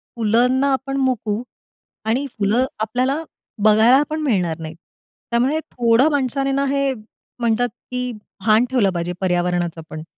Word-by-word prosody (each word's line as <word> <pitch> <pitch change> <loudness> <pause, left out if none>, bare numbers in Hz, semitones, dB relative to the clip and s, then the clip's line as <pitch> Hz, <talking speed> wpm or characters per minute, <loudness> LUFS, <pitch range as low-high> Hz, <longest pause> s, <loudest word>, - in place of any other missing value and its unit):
फुलांना 245 +5 +2
आपण 270 +1 -2
मुकू 235 -5 0 0.6
आणि 245 +6 0
फुलं 215 +5 +2
आपल्याला 255 +8 0 0.4
बघायला 220 +5 +6
पण 310 0 -2
मिळणार 180 - 0
नाहीत. 160 0 -7 0.6
त्यामुळे 260 +7 +2
थोडं 240 +4 +3
माणसाने 275 0 0
ना, 275 +1 +1
हे 275 -1 +1 0.5
म्हणतात 235 +1 +1 0.2
की 250 0 -2 0.3
भान 220 +2 +4
ठेवलं 240 -7 +2
पाहिजे 175 +1 -2
पर्यावरणाचं 175 -2 0
पण. 155 0 -7
240 Hz, 130 wpm, -20 LUFS, 210-270 Hz, 0.6 s, बघायला